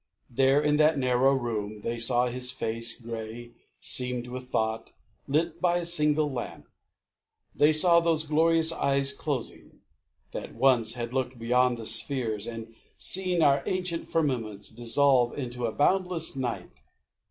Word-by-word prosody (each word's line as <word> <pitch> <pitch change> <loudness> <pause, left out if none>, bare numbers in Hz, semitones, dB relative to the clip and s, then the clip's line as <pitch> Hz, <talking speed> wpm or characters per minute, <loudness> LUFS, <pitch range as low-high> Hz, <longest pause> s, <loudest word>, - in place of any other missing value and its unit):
There, 135 +3 +3
in 150 0 +1
that 155 0 +3
narrow 130 +1 +2
room, 110 -4 -4
they 115 +2 -4
saw 120 +1 +3
his 125 0 -2
face 115 -2 -3
Grey, 115 0 -8 0.3
seamed 125 -1 0
with 125 +1 -7
thought, 110 -2 -2 0.3
lit 160 +4 -1
by 175 -1 +2
a 175 - -3
single 150 -3 +2
lamp; 125 -2 -7 0.9
They 150 +1 +4
saw 170 +2 +6
those 165 -2 +1
glorious 160 +1 +2
eyes 140 -3 0
Closing, 140 -6 -5 0.5
that - - -7
once 120 -2 +2
had 120 0 -5
looked 130 -1 -2
beyond 125 +1 +1
the 115 - -8
spheres 115 -2 0
And 115 -1 -8 0.2
seen 180 -3 0
our 140 -1 +4
ancient 180 -2 -2
firmaments 120 -10 -2
dissolve 120 +2 +2
Into 125 -3 -4
a - - -3
boundless 180 - 0
night. 125 -3 -5
130 Hz, 140 wpm, -27 LUFS, 120-155 Hz, 0.9 s, saw